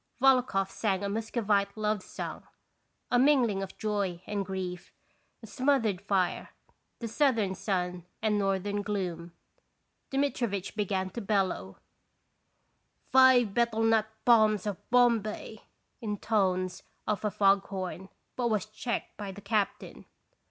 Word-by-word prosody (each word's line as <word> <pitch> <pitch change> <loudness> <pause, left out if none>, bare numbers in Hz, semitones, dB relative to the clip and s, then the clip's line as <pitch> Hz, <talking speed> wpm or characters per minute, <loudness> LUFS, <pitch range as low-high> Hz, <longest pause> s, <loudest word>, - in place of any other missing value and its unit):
Volokhoff 250 -7 +3
sang 200 -2 -1
a 200 - -1
Muscovite 210 -2 0
love 215 -1 0
song, - - -7 0.6
a 245 - +4
mingling 250 -8 +3
of 195 - -7
joy 200 -5 -2
and 205 -1 -2
grief; 185 -2 -5 0.5
a - - -7
smothered 230 -6 +1
fire, 195 -3 0 0.5
the 235 - -5
southern 230 -5 +2
sun 180 -2 -2
and 210 -1 +1
northern 200 +1 0
gloom. 180 -5 -4 0.8
Dmitrivitch 240 -9 -1
began 190 -3 -1
to 235 - -5
bellow: 190 - -1 0.7
" - - -43
Five 255 -5 +6
betel 235 -1 +1
nut 225 -1 +3 0.2
palms 215 -4 +5
of 205 -1 -5
Bombay," 225 -3 +2 0.4
intones 195 -4 0 0.2
of 210 0 -1
a 210 - +1
fog 195 -1 +3
horn, 190 -1 -5 0.3
but 245 -2 0
was 215 -3 0
checked 215 +3 -4
by 205 -2 -5
the 195 - -10
captain. 205 0 -2
205 Hz, 125 wpm, -29 LUFS, 195-225 Hz, 0.8 s, Five